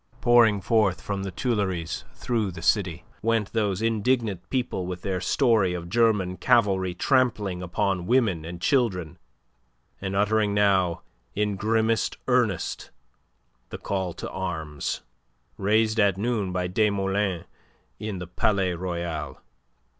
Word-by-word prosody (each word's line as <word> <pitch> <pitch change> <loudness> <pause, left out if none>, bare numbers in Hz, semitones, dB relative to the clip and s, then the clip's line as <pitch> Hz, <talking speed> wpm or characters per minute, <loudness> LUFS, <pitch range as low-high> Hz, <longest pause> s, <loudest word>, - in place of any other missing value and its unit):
Pouring 120 -4 +5
forth 105 -2 +2
from 100 -1 -4
the 95 - -3
Tuileries 90 - -2
through 115 -5 -1
the 85 -2 -8
city 90 -6 +1 0.2
went 115 -2 0
those 105 -2 0
indignant 110 -4 0
people 125 -8 -2
with 90 -1 -6
their 95 -3 -2
story 110 -10 +2
of 85 -1 -6
German 105 -5 +2
cavalry 95 -7 +2
trampling 110 -6 +1
upon 90 +1 -1
women 110 -10 +2
and 85 +2 -7
children, 95 - 0 0.8
and 95 0 -3
uttering 105 0 +2
now 95 -4 +2 0.3
in 105 0 0
grimmest 110 +2 +1
earnest - - 0 0.8
the - - -6
call 95 -2 -2
to - - -6
arms, 80 -6 -4 0.6
raised 110 +2 +2
at 100 -3 +3
noon 105 -3 -1
by 90 0 -1
Desmoulins 95 -2 0 0.5
in 105 -2 -4
the 90 - -5
Palais 95 +1 +1
Royal. 85 -5 -4
100 Hz, 125 wpm, -25 LUFS, 90-110 Hz, 0.8 s, Pouring